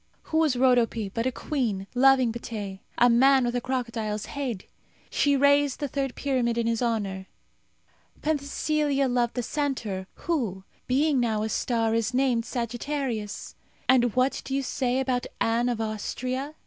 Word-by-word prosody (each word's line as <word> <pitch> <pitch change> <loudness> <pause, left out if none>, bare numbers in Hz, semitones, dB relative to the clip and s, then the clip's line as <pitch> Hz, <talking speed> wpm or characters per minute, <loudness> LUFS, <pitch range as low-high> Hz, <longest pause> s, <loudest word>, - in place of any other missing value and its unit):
Who 315 - +4
was 310 -5 +3
Rodope 240 -5 +2
but 230 +2 0
a - - +1
queen 235 -9 -2
loving 260 -1 +5
Pteh, 205 -5 -6 0.2
a 245 - +6
man 260 +2 +5
with 240 0 -1
a 245 - 0
crocodile's 230 -5 -2
head? 255 -9 -4 0.5
She 285 -1 +3
raised 285 0 +3
the 290 - -1
third 270 -2 -2
pyramid 250 -4 0
in 235 - +1
his 230 0 0
honour. 200 -5 -1 1.0
Penthesilea 290 -1 0
loved 245 -1 0
the 245 - -1
centaur, 230 -9 -2
who, 225 - -2 0.2
being 280 +2 +2
now 220 -3 +1
a 220 - -2
star, 225 -1 0
is 230 +2 0
named 250 -3 +2
Sagittarius. 240 -2 -3 0.3
And 245 -3 +4
what 255 +2 +2
do 270 - -3
you 275 - 0
say 255 0 0
about 255 -2 -1
Anne 235 +2 +2
of 240 -2 -2
Austria? 255 +6 -3
245 Hz, 155 wpm, -26 LUFS, 230-270 Hz, 1.0 s, a